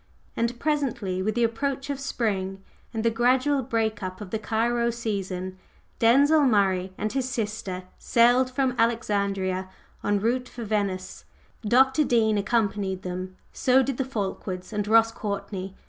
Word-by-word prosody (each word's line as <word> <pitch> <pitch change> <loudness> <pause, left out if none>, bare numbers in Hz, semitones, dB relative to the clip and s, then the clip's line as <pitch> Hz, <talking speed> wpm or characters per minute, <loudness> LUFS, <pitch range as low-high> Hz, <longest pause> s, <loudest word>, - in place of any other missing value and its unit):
And 235 +1 -1
presently, 250 -11 -1
with 215 +3 -1
the 240 - +2
approach 270 +5 -1
of 280 - -4
spring, 195 -7 -2 0.3
and 225 -2 -3
the 230 - +4
gradual 255 +4 +2
break 225 -3 -1
up 185 -1 -5
of 205 -3 -8
the 220 - -1
Cairo 235 +2 0
"season," 190 -5 -4 0.4
Denzil 280 +7 +5
Murray 190 -4 +2
and 215 - -2
his 260 -1 -1
sister 210 -6 -3 0.2
sailed 245 +2 +4
from 255 0 0
Alexandria 200 -5 0 0.3
en 205 0 +1
route 250 +4 0
for 240 - -7
Venice. 200 -3 -2 0.4
Dr. 265 +7 +4
Dean 220 -5 +2
accompanied 200 -3 0
them; 185 +1 -5 0.2
so 265 0 +4
did 270 -1 -2
the 270 - +1
Fulkewards 195 -5 -4
and 210 -1 -1
Ross 225 +1 +5
Courtney. 200 -3 -5
220 Hz, 145 wpm, -26 LUFS, 195-245 Hz, 0.4 s, Denzil